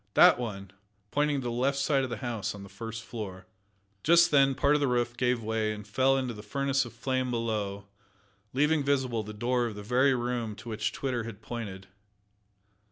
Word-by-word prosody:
"That - - +7
one," 100 -5 -5 0.4
pointing 145 -1 +1
to - - -8
the 120 - -2
left 130 +4 +1
side 140 -1 +2
of 130 - -2
the 115 - -4
house 115 -5 -3
on 100 - -9
the 100 - -11
first 115 +3 -7
floor. 95 -6 -7 0.6
Just 170 +1 +5
then 135 -2 +5
part 140 +3 +3
of 150 - +2
the 140 - +3
roof 120 -1 0
gave 125 -1 +1
way 110 0 0
and 105 -1 -7
fell 130 +5 +3
into 130 -2 -2
the 105 - -9
furnace 135 +5 0
of 120 - -10
flame 130 +1 -1
below, 105 -4 -2 0.7
leaving 150 +3 +2
visible 130 -5 +1
the 105 0 -7
door 120 +3 0
of 110 - -6
the 105 - -7
very 130 +5 +3
room 120 -3 -2
to 120 - -10
which 110 -1 -1
Twitter 125 -4 -2
had 115 -3 -9
pointed. 100 -5 -6
120 Hz, 200 wpm, -29 LUFS, 110-135 Hz, 0.7 s, That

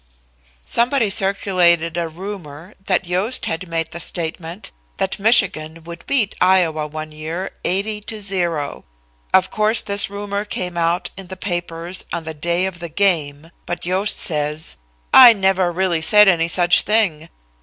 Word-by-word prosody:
Somebody 235 -2 +1
circulated 180 -4 +2
a 170 -1 -2
rumor 175 -1 -9
that 185 0 +1
Yost 185 +8 -1
had 180 +3 -4
made 165 -1 -2
the 170 - -7
statement 170 +2 -3 0.3
that 195 - -2
Michigan 165 -7 +2
would 170 0 -11
beat 230 -7 +1
Iowa 170 -5 +2
one 155 +1 -7
year 160 +5 -6
80 210 +3 -1
to 215 +1 -6
0. 175 -7 -3 0.5
Of 190 0 +3
course, 215 +2 +2
this 200 -1 -1
rumor 200 0 -4
came 180 -4 -5
out 170 +1 0
in 195 -2 -9
the 190 +1 -9
papers 175 -1 -4
on 170 - -4
the 160 0 -5
day 170 +4 -1
of 190 -2 -5
the 170 -1 -6
game, 160 -4 0 0.2
but 175 0 -4
Yost 190 +4 +1
says: 150 -1 -2 0.4
"I 245 -3 +10
never 190 -3 +1
really 175 -2 0
said 210 +5 +6
any 165 -3 +3
such 175 +1 +5
thing. 185 -7 0
180 Hz, 155 wpm, -19 LUFS, 165-200 Hz, 0.5 s, I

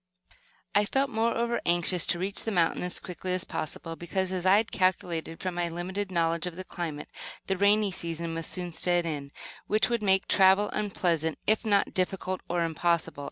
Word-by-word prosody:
I 205 +1 +4
felt, 270 +5 0
moreover, 235 +1 0
anxious 175 +1 +3
to 175 - +1
reach 195 +3 -2
the - - -2
mountains 175 -2 +1
as 180 - -2
quickly 180 +1 -5
as 185 - -1
possible, 165 +2 -5
because, 185 +3 -2
as 185 -1 -1
I 195 +2 +7
had 220 +1 0
calculated 175 -3 0
from 185 -1 -3
my 175 0 -1
limited 185 +4 -3
knowledge 170 0 +1
of 175 - -6
the 185 - -6
climate, 165 -5 -5 0.4
the 195 - 0
rainy 200 +1 +3
season 170 -1 -3
must 165 -1 -3
soon 180 -2 -3
set 175 +1 +1
in, 145 -4 -4 0.4
which 215 +3 +2
would 235 -1 +1
make 190 -2 +2
travel 195 +1 +5
unpleasant, 170 -6 0
if 215 +1 +2
not 205 -3 +2
difficult 185 0 -1
or 175 -1 +1
impossible. 165 -1 0
180 Hz, 185 wpm, -28 LUFS, 170-200 Hz, 0.4 s, I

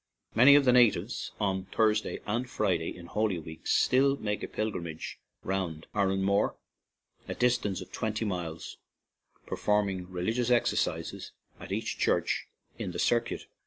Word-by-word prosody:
Many 130 +5 +8
of 145 -1 +5
the 125 - +5
natives 115 -4 +3
on 95 -2 0
Thursday 110 +2 +1
and 120 +4 -2
Friday 95 -9 0
in 85 - -10
Holy 100 +2 0
Week 80 0 -9
still 135 +2 +3
make 105 -3 -2
a - - -4
pil 110 0 -2
grimage 85 -4 -6 0.2
round 90 -5 -3
Aranmore, 100 0 +1 0.7
a - - -4
distance 125 -6 +1
of - - -10
twenty 110 0 -2
miles, 85 -5 -4 0.7
performing 100 -3 0
religious 110 +7 -1
ex 120 -1 +3
ercises - - -2 0.3
at - - -9
each - - -2
church - - +1 0.3
in 90 - -4
the - - -5
circuit. 120 0 0
105 Hz, 145 wpm, -29 LUFS, 90-115 Hz, 0.7 s, Many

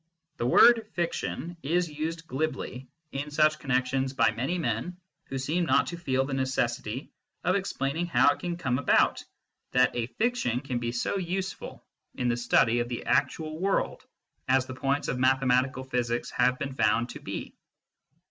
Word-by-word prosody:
The 120 - -1
word 225 - +6
" - - -39
fiction 175 0 -3
" - - -33
is 175 +4 +1
used 160 +2 -4
glibly 135 -3 -3 0.2
in 140 +2 -4
such 155 +1 +3
connexions 130 0 0
by 130 - +3
many 135 +10 -2
men 165 +4 -2 0.3
who 135 - -5
seem 155 +7 0
not - - +3
to 175 - -5
feel 135 -5 0
the 135 - -4
necessity 130 -2 -2 0.3
of 180 +2 +2
explaining 175 -4 -1
how 170 - +5
it - - -13
can 175 -1 -3
come 130 -6 0
about 140 - +3 0.5
that 125 0 +3
a 120 -1 -1
fiction 125 - 0
can 130 -4 -3
be 120 0 -2
so 120 +11 -1
useful 185 +1 -4 0.3
in 125 - 0
the 120 - +2
study 120 -1 +3
of 120 0 -2
the 120 - -5
actual 155 0 0
world 195 +2 0 0.4
as 130 0 +3
the 130 - -7
points 135 +2 -1
of 125 - -2
mathematical 130 0 +2
physics 120 -2 -2
have 125 +1 +2
been 135 0 -4
found 115 0 +2
to - - -8
be. - - -6
135 Hz, 175 wpm, -28 LUFS, 125-165 Hz, 0.5 s, word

